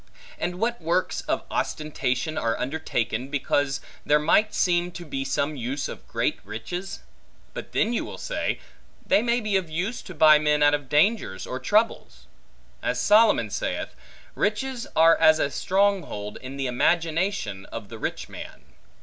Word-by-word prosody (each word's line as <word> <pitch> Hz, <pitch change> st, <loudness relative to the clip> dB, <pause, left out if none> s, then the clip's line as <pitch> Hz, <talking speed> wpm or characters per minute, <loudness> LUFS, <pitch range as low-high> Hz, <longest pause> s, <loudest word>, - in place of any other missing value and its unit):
and 175 Hz, -, -2 dB
what 235 Hz, 0 st, -1 dB
works 170 Hz, +3 st, 0 dB
of -, -, 0 dB
ostentation 150 Hz, -1 st, -2 dB
are 115 Hz, 0 st, 0 dB
undertaken, 130 Hz, -4 st, -2 dB
because 145 Hz, 0 st, 0 dB, 0.2 s
there 150 Hz, -, +4 dB
might 170 Hz, +8 st, +3 dB
seem 175 Hz, -1 st, +1 dB
to 175 Hz, 0 st, -8 dB
be 135 Hz, -3 st, -3 dB
some 140 Hz, +2 st, -1 dB
use 130 Hz, +2 st, -3 dB
of -, -, -9 dB
great -, -, -1 dB
riches? 115 Hz, -, -6 dB, 0.5 s
But -, -, -7 dB
then 230 Hz, -, +1 dB
you -, -, 0 dB
will -, -, -8 dB
say, -, -, -2 dB, 0.5 s
they -, -, +4 dB
may 235 Hz, +1 st, +1 dB
be 215 Hz, -4 st, +1 dB
of 180 Hz, -4 st, -3 dB
use, 185 Hz, +9 st, -3 dB
to 185 Hz, -, -10 dB
buy 155 Hz, 0 st, +7 dB
men 150 Hz, -1 st, +2 dB
out 145 Hz, 0 st, +5 dB
of 145 Hz, -3 st, -2 dB
dangers 150 Hz, -, +2 dB
or 130 Hz, -, -4 dB
troubles. 215 Hz, -, 0 dB, 0.6 s
As -, -, -1 dB
Solomon 210 Hz, -, +4 dB
saith, -, -, -3 dB, 0.4 s
Riches 240 Hz, +4 st, -1 dB
are 165 Hz, +1 st, +7 dB
as 155 Hz, 0 st, +6 dB
a 140 Hz, -, 0 dB
strong 200 Hz, +3 st, +2 dB
hold, 105 Hz, -8 st, -7 dB
in 130 Hz, +2 st, -7 dB
the 135 Hz, -, -2 dB
imagination 160 Hz, -, 0 dB
of 110 Hz, -3 st, -8 dB
the 115 Hz, -, -9 dB
rich -, -, -3 dB
man. -, -, -10 dB
155 Hz, 165 wpm, -25 LUFS, 135-195 Hz, 0.6 s, buy